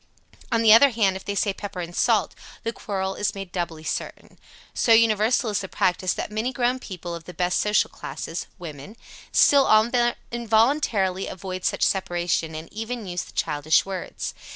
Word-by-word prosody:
On 230 -1 +2
the 215 -1 +8
other 275 +5 +8
hand, 210 -6 +1
if 190 - -7
they 200 - -3
say 200 0 +1
"pepper 200 -1 -7
and 175 0 -6
salt," - - +2 0.3
the 230 0 -2
quarrel 190 -3 -3
is 205 +1 -2
made 195 -2 -7
doubly 170 -3 -4
certain. - - -5 0.3
So 230 - +3
universal 225 +1 +3
is 205 - 0
the 190 - -5
practice 180 0 0
that - - -5
many 220 +4 -1
grown 250 0 0
people 180 -6 -7
of 170 -1 -8
the 180 - -10
best 180 +1 +1
social 210 -1 +2
class 140 +3 -7 0.3
(women) 165 +5 -9 0.3
still 280 -2 +5 0.6
involuntarily 225 -4 +1
avoid 185 0 -6
such - - 0
separation, 175 -4 0
and 160 +1 -8
even 225 +1 -5
use 175 -2 -3
the - - -12
childish 150 +1 +1
words. 190 -2 -5
195 Hz, 175 wpm, -24 LUFS, 180-225 Hz, 0.6 s, the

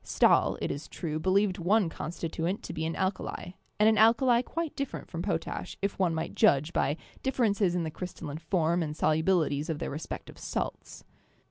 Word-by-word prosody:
Stahl, - - +3
it - - 0
is 145 +2 -5
true, 155 -2 -4
believed 190 +2 +2
one 195 +3 +3
constituent 165 +3 -3
to - - -6
be 160 0 -2
an 165 - -3
alkali, 190 -1 -2 0.3
and 210 - +6
an 220 -1 +4
alkali 235 +2 +5
quite 330 +4 -4
different 275 - -4
from - - -3
potash, - - -3
if 200 0 -2
one 175 -4 +2
might 160 +1 -3
judge 145 +4 +3
by 145 +3 +1 0.2
differ 265 -2 0
ences 200 -4 +2
in 175 - 0
the 160 - -3
crystalline 160 -4 -6
form 170 +1 +1
and 150 -2 -3
solubilities 155 -1 +2
of 160 - -1
their - - -4
re 145 - -4
spective - - -8
salts. - - -4
175 Hz, 190 wpm, -29 LUFS, 160-200 Hz, 0.3 s, and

